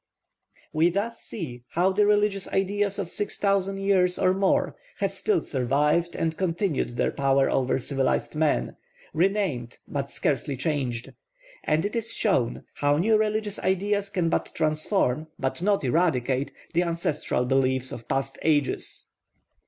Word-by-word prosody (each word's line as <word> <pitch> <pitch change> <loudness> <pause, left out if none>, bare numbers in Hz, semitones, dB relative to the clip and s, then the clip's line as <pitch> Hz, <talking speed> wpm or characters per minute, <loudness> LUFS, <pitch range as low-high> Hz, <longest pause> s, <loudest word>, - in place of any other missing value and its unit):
We 160 +3 +4
thus 205 +6 -2
see 130 - -6
how 180 +3 +3
the 205 +2 +3
religious 205 -2 +2
ideas 200 +1 0
of 185 -4 -3
six 205 - -3
thousand 195 -1 +1
years 190 -2 +2
or 185 - +3
more 195 0 +1 0.2
have - - -1
still 425 -3 0
survived 150 +6 +1
and 160 -1 -1
continued 165 - -1
their - - +1
power 135 0 +2
over 130 -1 +1
civilised 135 +2 -1
man, 150 - +1 0.4
renamed 170 - 0
but 140 -1 -3
scarcely 140 0 -1
changed; 130 -4 -2 0.5
and 155 +3 +1
it 205 - -3
is 230 0 -2
shown 130 - +1
how 145 0 +2
new 215 +7 +3
religious 215 -1 0
ideas 200 +2 0
can 180 -4 0
but - - -1
transform, 155 -2 0
but 135 +5 -2
not 200 -1 +2
eradicate, 135 -3 +1 0.2
the 170 - +3
ancestral 165 -7 -1
beliefs 130 0 +1
of 115 - -8
past 135 0 -2
ages. 145 -3 0
165 Hz, 145 wpm, -26 LUFS, 135-195 Hz, 0.5 s, We